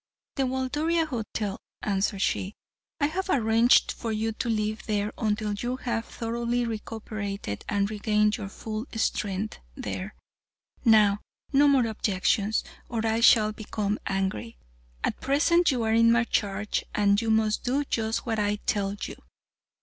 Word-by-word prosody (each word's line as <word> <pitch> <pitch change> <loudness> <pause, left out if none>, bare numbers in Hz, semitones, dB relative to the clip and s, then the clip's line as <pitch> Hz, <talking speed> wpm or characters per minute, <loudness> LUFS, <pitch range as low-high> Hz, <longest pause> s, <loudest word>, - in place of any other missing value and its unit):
"The 270 -2 0
Waldoria 295 +6 0
Hotel," 220 -7 -4 0.2
answered 195 -1 0
she. 195 +3 -1 0.4
"I 290 - +3
have 375 +6 -2
arranged 230 -3 +4
for 230 - -4
you 220 +1 -1
to 235 +2 -3
live 215 -1 -1
there 210 0 -1
until 210 -1 -1
you 240 +5 -2
have 235 -3 -2
thoroughly 235 +1 -2
recuperated 215 - -5
and 200 -1 +1
regained 210 0 +1
your 200 -4 -6
full 220 +4 -5
strength 210 -2 -1 0.2
there, 190 +3 -5 0.7
now, 210 -4 +5 0.3
no 285 +1 +6
more 270 -4 +4
objections, 215 0 +1 0.3
or 225 -1 -2
I 225 0 +1
shall 220 -2 +6
become 210 -1 -3
angry. 190 - -2 0.5
At - - -1
present, 335 +6 +3
you 250 -4 +1
are 220 0 +1
in 230 0 +5
my 235 +1 +4
charge, 210 -2 -1
and 205 0 +3
must 220 -1 +2
do 265 +3 +1
just 225 -4 -1
what 225 -2 -1
I 205 0 +1
tell 200 -1 0
you." - - -5
220 Hz, 145 wpm, -27 LUFS, 210-240 Hz, 0.7 s, no